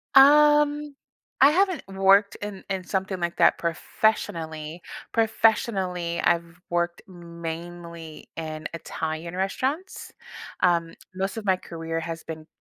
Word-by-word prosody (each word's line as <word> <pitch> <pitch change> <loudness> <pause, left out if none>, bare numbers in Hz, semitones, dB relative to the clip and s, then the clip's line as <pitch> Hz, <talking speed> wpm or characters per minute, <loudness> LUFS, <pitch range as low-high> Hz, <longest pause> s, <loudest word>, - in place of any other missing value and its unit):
Um, 295 +1 +6 0.5
I 275 +2 +8
haven't 370 +1 +2
worked 195 +1 +4
in 205 -2 -6
in 190 -1 -2
something 190 0 -2
like 170 0 -2
that - - +5
professionally. 165 -3 -1 0.3
Professionally, 195 -6 +1
I've 170 0 0
worked, 175 0 0
mainly, 170 -2 -8
in 155 -1 -5
Italian 165 +1 -4
restaurants, 265 - -2 0.5
um, 170 -2 +2 0.2
most 190 +3 -3
of 215 - -5
my 190 - +4
career 165 -2 -5
has 165 0 -5
been 160 -1 -8
180 Hz, 115 wpm, -25 LUFS, 165-210 Hz, 0.5 s, I